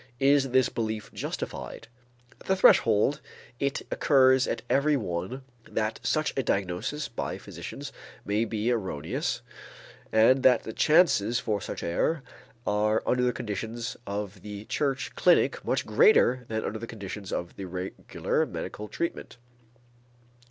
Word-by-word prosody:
Is 140 0 +4
this 130 0 +4
belief 110 -3 -4
justified? - - -5 0.5
At - - -16
the 190 - +3
threshold, 130 - +4 0.4
it 140 0 -1
occurs 130 -2 +4
to - - -1
every 145 +2 +3
one 95 +5 -4 0.3
that 110 0 -1
such 155 0 0
a 135 - +1
diagnosis 100 +8 -2
by 115 - -4
physicians - - -8 0.3
may 105 +2 +1
be 115 +1 -1
erroneous 95 -10 -2 0.7
and 115 +5 +5
that 125 -2 +5
the 110 - -6
chances 140 - +4
for 105 -3 -2
such - - -6
error 135 - 0 0.4
are 105 +1 +1
under 125 - +2
the 125 0 +3
conditions 115 +2 -4
of 100 -1 -4
the 105 0 -8
church 135 +1 -1
clinic - - +3
much - - 0
greater 280 - +4
than 110 0 -2
under 110 - -3
the 115 - -6
conditions 100 -3 -7
of 85 0 -3
a 95 - -4
regular 90 +1 -2
medical 105 - -6
treatment. 170 0 -4
115 Hz, 140 wpm, -27 LUFS, 105-135 Hz, 0.7 s, and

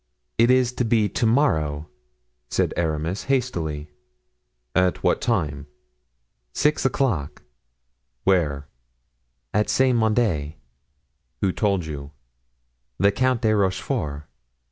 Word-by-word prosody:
"It 115 +1 +5
is 125 -1 +3
to - - +1
be 110 -2 +2
to 115 - 0
morrow," 80 - +1 0.6
said - - 0
Aramis 80 +3 -2
hastily. 85 - -2 0.8
"At 90 -1 +1
what - - +2
time?" 75 -1 -1 0.9
"Six 150 -1 +1
o'clock." 115 - -1 0.8
"Where?" 75 -6 +1 0.9
"At 105 +1 +1
Saint 130 -2 +3
Mande." 105 -10 +1 0.9
"Who 95 - +2
told 100 -4 0
you?" 70 -2 -6 0.9
"The 100 +2 +4
Count 130 +3 +1
de 110 -1 +3
Rochefort." 85 -7 -1
95 Hz, 100 wpm, -23 LUFS, 75-120 Hz, 0.9 s, It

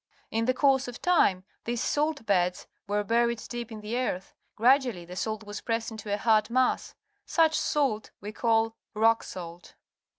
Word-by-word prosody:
In 225 +1 0
the 255 - +2
course 270 -2 +3
of 245 - -7
time 200 - +3 0.2
these 240 0 -2
salt 295 -2 0
beds 180 -3 +1 0.2
were 205 +1 0
buried 235 +1 +1
deep 240 -1 -5
in 215 -1 -7
the 220 +4 -2
earth. 195 -7 -3 0.2
Gradually 245 -6 +3
the 180 +1 -9
salt 215 +2 -3
was 205 0 -7
pressed 230 -1 -2
into 215 -2 -7
a 205 - +1
hard 215 0 +3
mass. 255 +1 +1 0.3
Such 320 -2 +3
salt 270 -10 0
we 205 +1 -6
call 225 0 +1 0.2
rock 225 +1 +4
salt. 175 -1 -9
225 Hz, 170 wpm, -28 LUFS, 210-250 Hz, 0.3 s, rock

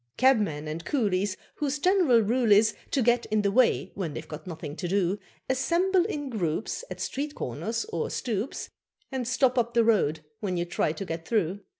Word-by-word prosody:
Cabmen 210 - +3
and 155 +2 -4
coolies, 200 - 0 0.2
Whose 295 -1 -1
general 330 - +4
rule 230 +1 +1
is 215 +1 +6 0.2
To 265 - +1
get 240 +1 +2
in 215 -1 +1
the 200 - +2
way 250 +3 +3
when 165 -7 -4
they've 155 - -6
got 155 +3 -8
nothing 160 -4 -6
to 180 - -3
do, 190 +1 +1 0.3
Assemble 350 +7 +2
in 290 -9 -4
groups 180 - -2
At - - -7
street 290 +2 -3
corners 210 - -3
or 165 - -3
stoeps, 230 0 -3 0.4
And 260 -3 -2
stop 255 0 +3
up 235 0 -1
the 235 - +5
road 175 -9 +2 0.2
when 185 -4 -2
you 175 - 0
try 175 -3 0
to 195 +5 -5
get 165 -1 -5
through. 200 -4 0
215 Hz, 190 wpm, -27 LUFS, 175-255 Hz, 0.4 s, is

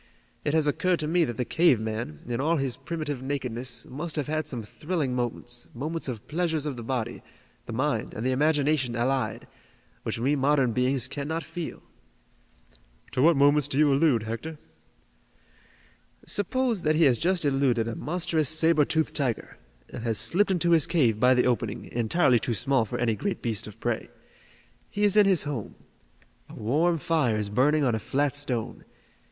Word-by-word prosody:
It 145 - 0
has 160 -2 +3
occurred 165 +5 +1
to 150 - -2
me 170 +1 +3
that 120 -5 -5
the 125 - -1
cave 160 -6 +3
man, 110 -9 -5
in 120 +1 -2
all 165 +3 +2
his 135 -3 -1
primitive 155 -5 -5
nakedness, 125 -3 -2
must 155 +5 -5
have 150 -3 -1
had 155 +1 -2
some 120 -4 -3
thrilling 150 - -3
moments, 120 0 -3
moments 155 +6 -3
of 115 -5 -6
pleasures 160 -2 -1
of 145 -3 -3
the 120 - -7
body, 120 -1 -3 0.5
the - - -5
mind 130 -1 -1
and 110 - -4
the 130 - +2
imagination 145 -2 +1
allied, 130 +3 -1 0.5
which - - -3
we 135 +6 +1
modern 135 -2 +2
beings 125 +1 +1
cannot 150 +5 -4
feel." 175 -3 -7 1.3
"To - - 0
what 165 +1 +5
moments 145 0 +4
do 140 - -2
you 150 -2 +4
allude, 135 -6 +3
Hector?" 115 +9 -5 1.7
"Suppose 235 +1 0
that 155 -1 +2
he 165 - +4
has 130 -6 +4
just 180 -2 +1
eluded 135 -5 +1
a 115 - -4
monstrous 160 -2 0
saber 155 -1 +3
toothed 160 +1 0
tiger, 130 -6 -2 0.3
and - - -7
has 115 -2 0
slipped 170 - +2
into 175 -2 +1
his 160 -4 +4
cave 120 -11 +2
by 125 +2 +5
the 125 - +3
opening, 115 -3 -1
entirely 120 +2 +2
too 120 0 -2
small 130 +2 +1
for - - -5
any 120 -2 +1
great 200 - -3
beast 110 -5 -1
of 105 +1 -12
prey. 120 -1 -2 0.8
He 205 - -2
is 205 -1 +4
in 210 -2 +6
his 185 -5 +3
home. 140 -8 -5 0.7
A - - -11
warm 160 +10 +1
fire 145 -7 +1
is 105 -1 -2
burning 145 +8 +2
on 125 -4 +2
a 110 - -1
flat 140 +5 0
stone. 130 -6 -3
140 Hz, 180 wpm, -26 LUFS, 120-160 Hz, 1.7 s, in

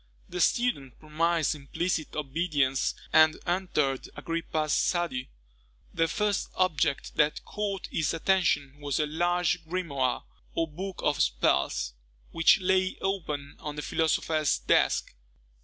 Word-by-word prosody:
The 180 0 -3
student 165 - +1
promised 160 +1 +1
implicit 155 +3 -3
obedience, 145 -2 0 0.2
and 155 0 +6
entered 175 -7 0
Agrippa's 160 -2 -2
study. 170 -8 0 0.6
The 165 0 +2
first 210 +1 0
object 165 -6 0
that 150 0 +2
caught 200 -2 -3
his 155 -3 0
attention 160 -5 +1
was 145 -1 -2
a 155 - +2
large 175 +2 0
grimoire, 160 -7 -1 0.3
or 165 - +1
book 185 +5 -6
of 150 - +1
spells, - - +1 0.4
which 165 - +5
lay 185 0 +2
open 150 -7 -3
on 150 -1 -6
the 150 - -4
philosopher's 155 -1 +1
desk. - - +2
160 Hz, 120 wpm, -28 LUFS, 145-180 Hz, 0.6 s, and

